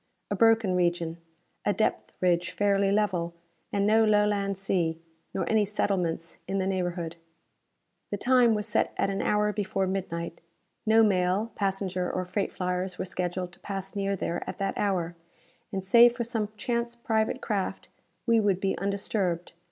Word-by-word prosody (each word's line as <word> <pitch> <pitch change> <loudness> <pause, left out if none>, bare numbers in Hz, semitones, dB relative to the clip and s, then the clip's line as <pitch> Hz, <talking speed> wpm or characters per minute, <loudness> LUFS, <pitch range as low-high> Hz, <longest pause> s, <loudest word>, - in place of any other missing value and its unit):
A - - +1
broken 225 -4 +4
region, 170 -2 0 0.5
a 205 - +2
depth 220 - 0
ridge 175 -1 +2
fairly 200 -1 +2
level, 185 -5 0 0.4
and 200 0 +1
no 220 +2 +5
Lowland 205 -2 +2
sea, 175 -4 0 0.3
nor - - -2
any 220 -1 +3
settlements 180 -5 -1
in 195 - -1
the 190 - 0
neighborhood. 175 -3 -2 0.9
The 205 - -2
time 245 0 +4
was 210 -1 -2
set 210 - +1
at 195 - +1
an 195 - -2
hour 210 0 +2
before 200 -2 -1
midnight. 170 -3 -3 0.5
No 225 +1 +6
mail, 195 +2 +2
passenger 190 -2 -1
or 185 - -2
freight 195 +2 -2
flyers 180 0 -2
were - - -2
scheduled 180 0 -3
to - - -16
pass 195 0 -5
near 200 0 0
there 175 -2 -2
at - - -6
that 195 -1 -1
hour, 180 -4 0 0.6
and, 190 -2 -3
save 235 +4 +7
for 240 - -1
some 225 -3 -2
chance 235 +1 -1
private 220 -2 0
craft, 200 -4 -3 0.4
we 230 -2 +4
would 200 -4 +2
be 195 0 0
undisturbed. 195 -3 -1
195 Hz, 160 wpm, -28 LUFS, 180-210 Hz, 0.9 s, save